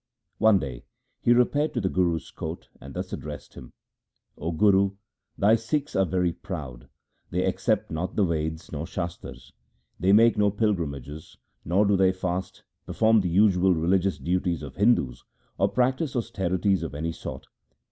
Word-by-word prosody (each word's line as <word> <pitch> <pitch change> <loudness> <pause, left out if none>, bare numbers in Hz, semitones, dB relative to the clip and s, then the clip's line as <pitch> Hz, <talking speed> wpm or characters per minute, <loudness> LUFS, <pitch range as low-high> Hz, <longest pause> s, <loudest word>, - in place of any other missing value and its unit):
One 110 -2 +5
day 65 -8 -5 0.4
he 120 - +3
repaired 135 +5 +2
to - - +1
the 95 - 0
Guru's 90 -3 0
court - - -7
and 70 0 -10
thus - - -5
addressed 75 +1 -7
him: 65 -3 -11 0.3
' - - -51
O 85 +3 -2
Guru, 100 +2 +3 0.4
thy 105 +2 +4
Sikhs 140 +6 -2
are 95 -1 +3
very 90 0 0
proud; 70 -12 -8 0.4
they - - 0
accept - - 0
not 80 +3 -3
the 105 - +3
Veds 80 -1 -3
or 80 +2 -4
Shastars; 70 -7 -7 0.5
they 95 +3 +3
make 115 +1 +5
no 105 0 +4
pilgrimages; 80 - -3 0.3
nor 95 +5 +2
do 100 0 +3
they 95 -1 +4
fast, 95 0 -4 0.2
perform 110 -1 +3
the 90 - -1
usual 95 0 +4
religious 90 +2 +1
duties 85 +2 -1
of 70 -2 -8
Hindus, 100 - +2 0.4
or - - +3
practise 130 +3 0
austerities 95 -4 0
of 80 -3 -5
any 80 +3 -2
sort. - - -8
90 Hz, 160 wpm, -26 LUFS, 80-105 Hz, 0.5 s, One